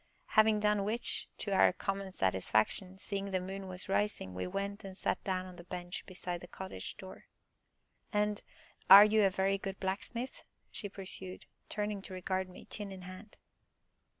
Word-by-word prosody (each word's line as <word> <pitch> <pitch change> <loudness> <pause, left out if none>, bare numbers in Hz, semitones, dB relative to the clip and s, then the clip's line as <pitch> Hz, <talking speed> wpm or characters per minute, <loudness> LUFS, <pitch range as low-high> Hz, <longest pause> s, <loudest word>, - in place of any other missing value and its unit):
Having 215 -1 +5
done 210 -1 +3
which, 220 +4 -2
to 205 - -3
our 190 - +6
common 195 +1 -3
satisfaction, 110 - +1
seeing 200 0 -3
the 190 -1 +1
moon 190 +1 -5
was 185 0 -7
rising, 195 - 0
we 90 0 -3
went 200 - -3
and 190 -1 -8
sat - - -1
down 185 -2 -1
on 180 -1 -10
the 175 - -9
bench 175 0 -5
beside 180 -2 -4
the 180 - -9
cottage 190 - -7
door. 190 0 -10 0.9
"And 210 -1 +1 0.5
are 200 +2 +13
you 215 0 +4
a 195 - +6
very 195 +1 +1
good 195 0 -5
blacksmith?" 210 +6 -3 0.3
she 205 - -4
pursued, 190 -1 -6 0.2
turning 210 -1 -2
to 190 - -9
regard 185 0 -1
me, 180 - -12
chin 205 -2 -6
in 190 -1 -8
hand. 185 +4 -10
195 Hz, 170 wpm, -33 LUFS, 185-205 Hz, 0.9 s, are